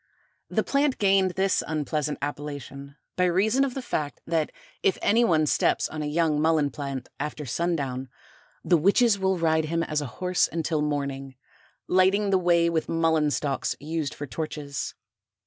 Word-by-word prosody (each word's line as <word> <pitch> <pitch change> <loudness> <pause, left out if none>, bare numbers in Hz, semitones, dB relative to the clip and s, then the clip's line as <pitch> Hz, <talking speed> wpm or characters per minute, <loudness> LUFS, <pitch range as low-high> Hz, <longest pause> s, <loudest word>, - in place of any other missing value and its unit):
The - - +1
plant 280 -1 +1
gained 195 -2 +3
this 190 -1 +2
unpleasant 150 -1 -2
appellation 140 -1 -6 0.2
by 180 - +2
reason 210 +9 +2
of 270 -3 -2
the 265 - -4
fact 150 -10 -3
that 160 -2 0 0.3
if 395 -2 +2
any 230 +3 +3
one 160 -8 +3
steps - - +2
on 155 - -5
a 150 - -2
young 155 -1 +1
Mullen 155 -3 +2
plant 140 -2 -5
after 150 +1 -4
sundown, 135 -2 -2 0.6
the 175 - +4
witches 200 +5 +3
will 190 -1 +1
ride 160 -1 +2
him 165 +1 -1
as 150 -2 -1
a 145 - -4
horse 180 -1 +1
until 160 -2 -1
morning, 140 -2 -3 0.5
lighting 190 +2 +3
the 190 - +4
way 170 -1 +3
with 165 -2 -1
Mullen 160 -2 +2
stalks 140 -2 -1
used 155 0 -3
for 145 - -5
torches. 145 -1 -5
160 Hz, 165 wpm, -26 LUFS, 145-185 Hz, 0.6 s, the